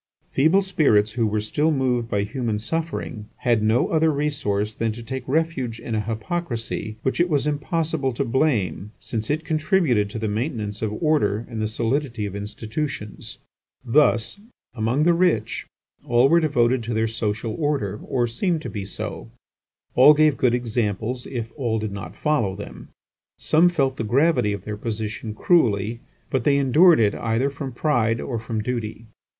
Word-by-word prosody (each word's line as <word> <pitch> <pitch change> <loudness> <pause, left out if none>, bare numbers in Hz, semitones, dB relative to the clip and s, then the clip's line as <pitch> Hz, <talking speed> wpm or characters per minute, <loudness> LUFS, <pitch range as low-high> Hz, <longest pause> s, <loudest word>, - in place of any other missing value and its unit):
Feeble 160 +8 +4
spirits 135 - +3
who 115 -1 0
were 105 0 0
still 145 +9 0
moved 125 -5 0
by 100 -2 0
human 110 0 -2
suffering 130 -4 -4
had 120 -3 +2
no 110 +3 +2
other 160 0 +3
resource 110 -8 -1
than 115 +1 -1
to 120 +1 -9
take 130 +3 -4
refuge 135 -6 -1
in 115 - -5
a 110 - +1
hypocrisy 115 - -4
which 130 - -1
it 175 +1 +3
was 145 -3 +1
impossible 150 -1 -1
to 135 +4 -1
blame, 115 - 0
since 110 -2 -4
it 155 +2 -1
contributed 155 - +2
to 105 - -6
the 110 0 -2
maintenance 105 -2 -3
of 110 -2 -1
order 120 -8 +2
and 115 -2 -5
the 110 - 0
solidity 115 +1 -1
of 100 -1 -5
institutions. 105 +3 -5 0.5
Thus, 120 - +2 0.3
among 120 +5 0
the 170 +2 +5
rich, 170 - +1 0.4
all 120 +3 +4
were 170 - +5
devoted 130 -6 +2
to 115 0 -2
their 110 0 +1
social 110 0 -2
order, 140 -10 -1
or 120 -2 0
seemed 160 - -1
to - - -5
be 100 -3 -5
so; 95 - -6 0.6
all 145 +4 +8
gave 155 -1 +4
good 125 -2 +2
examples, 120 0 -2
if 115 -3 -5
all 120 -6 -1
did 110 -1 -3
not 100 0 -7
follow 130 -11 0
them. 100 - -9 0.5
Some 165 +3 +4
felt 135 -6 0
the - - -2
gravity 135 0 +2
of 100 -2 -4
their 105 -1 -4
position 110 0 -4
cruelly; 115 - +2 0.3
but 130 -3 0
they 140 +2 +3
endured 150 +5 +5
it 105 -3 +3
either 115 +5 0
from 140 -1 -6
pride 120 -4 +1
or 120 -4 -3
from 110 -1 -3
duty. 115 -2 -4
120 Hz, 170 wpm, -23 LUFS, 110-150 Hz, 0.6 s, all